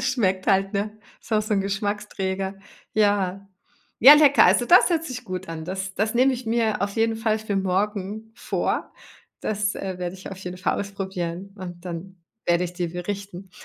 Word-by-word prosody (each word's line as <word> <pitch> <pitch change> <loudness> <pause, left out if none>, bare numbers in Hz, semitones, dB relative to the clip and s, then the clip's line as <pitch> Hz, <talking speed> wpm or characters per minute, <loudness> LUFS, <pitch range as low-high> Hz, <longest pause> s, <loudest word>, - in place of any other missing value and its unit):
Schmeckt 200 -8 0
halt, 195 -1 +2
ne? 205 +1 -1 0.3
Ist 230 - -10
auch 215 0 +3
so 215 0 -1
'n 195 - +2
Geschmacksträger. 195 -1 -2 0.4
Ja. 200 -2 +1 0.5
Ja, 270 +6 +11
lecker. 295 -2 +6
Also 240 - +4
das 360 +1 +6
hört 330 -1 +1
sich 255 -4 -6
gut 185 -2 -5
an. 160 -1 -5
Das 190 +1 -4
das 215 +3 0
nehme 260 +2 +4
ich 250 0 -5
mir 220 -3 +1
auf 200 +1 -2
jeden 225 0 +2
Fall 220 -1 0
für 210 -2 -3
morgen 205 +3 -2
vor. - - -2 0.5
Das, 210 0 -1
äh, 190 -2 -5
werde 180 0 -4
ich 190 +1 -9
auf 190 - -8
jeden 180 -1 -6
Fall 195 - 0
ausprobieren 195 -1 -5
und 175 -1 -8
dann 180 +2 -7 0.3
werde 175 +1 +3
ich 175 - -5
dir 175 -2 -2
berichten. 195 +1 -6
195 Hz, 185 wpm, -24 LUFS, 185-220 Hz, 0.5 s, Ja